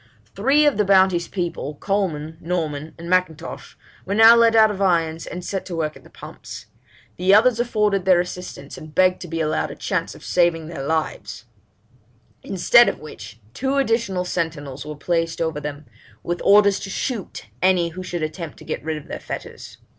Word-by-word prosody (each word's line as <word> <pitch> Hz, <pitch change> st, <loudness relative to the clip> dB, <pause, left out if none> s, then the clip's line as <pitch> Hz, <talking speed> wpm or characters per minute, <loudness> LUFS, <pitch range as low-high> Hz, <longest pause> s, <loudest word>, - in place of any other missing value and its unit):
'Three 275 Hz, +9 st, +3 dB
of 290 Hz, -, +3 dB
the 210 Hz, -, +3 dB
Bounty's 190 Hz, -3 st, +3 dB
people, 170 Hz, -5 st, -4 dB
Coleman, 160 Hz, -4 st, -2 dB
Norman, 160 Hz, -3 st, -3 dB
and 170 Hz, 0 st, -9 dB
M'Intosh, 170 Hz, -3 st, -2 dB, 0.3 s
were 200 Hz, -, -3 dB
now 225 Hz, +2 st, +8 dB
let 230 Hz, -1 st, +4 dB
out 220 Hz, -1 st, +6 dB
of 200 Hz, -1 st, -6 dB
irons, 165 Hz, -4 st, +1 dB
and 180 Hz, 0 st, -7 dB
sent 195 Hz, 0 st, -3 dB
to 180 Hz, -, -5 dB
work 155 Hz, -2 st, -2 dB
at -, -, -15 dB
the -, -, -17 dB
pumps. -, -, -10 dB, 0.5 s
The 185 Hz, +3 st, +4 dB
others 235 Hz, +2 st, +4 dB
offered 210 Hz, -5 st, +1 dB
their 185 Hz, -2 st, +5 dB
assistance, 180 Hz, -5 st, -6 dB
and 155 Hz, -1 st, -12 dB
begged 185 Hz, 0 st, +3 dB
to 180 Hz, -, -7 dB
be 165 Hz, 0 st, -3 dB
allowed 155 Hz, 0 st, -1 dB
a -, -, -8 dB
chance -, -, -3 dB
of -, -, -14 dB
saving 170 Hz, -2 st, +1 dB
their 165 Hz, -5 st, -6 dB
lives; 140 Hz, -8 st, -3 dB, 1.0 s
instead 195 Hz, +6 st, +5 dB
of -, -, -6 dB
which, 110 Hz, -7 st, -11 dB
two 265 Hz, -, -1 dB
additional 225 Hz, -8 st, 0 dB
sentinels 150 Hz, -6 st, -4 dB
were 150 Hz, -, -6 dB
placed 165 Hz, +2 st, -1 dB
over 160 Hz, -2 st, -1 dB
them, 150 Hz, 0 st, -7 dB, 0.4 s
with 175 Hz, 0 st, -3 dB
orders 200 Hz, 0 st, +5 dB
to 195 Hz, -, -7 dB
shoot 225 Hz, 0 st, -4 dB, 0.2 s
any 180 Hz, -2 st, +3 dB
who 180 Hz, +3 st, -8 dB
should 175 Hz, -3 st, -4 dB
attempt 155 Hz, 0 st, -5 dB
to -, -, -13 dB
get -, -, -4 dB
rid 155 Hz, 0 st, -3 dB
of 150 Hz, -, -11 dB
their -, -, -6 dB
fetters. -, -, -8 dB
175 Hz, 185 wpm, -22 LUFS, 160-200 Hz, 1.0 s, now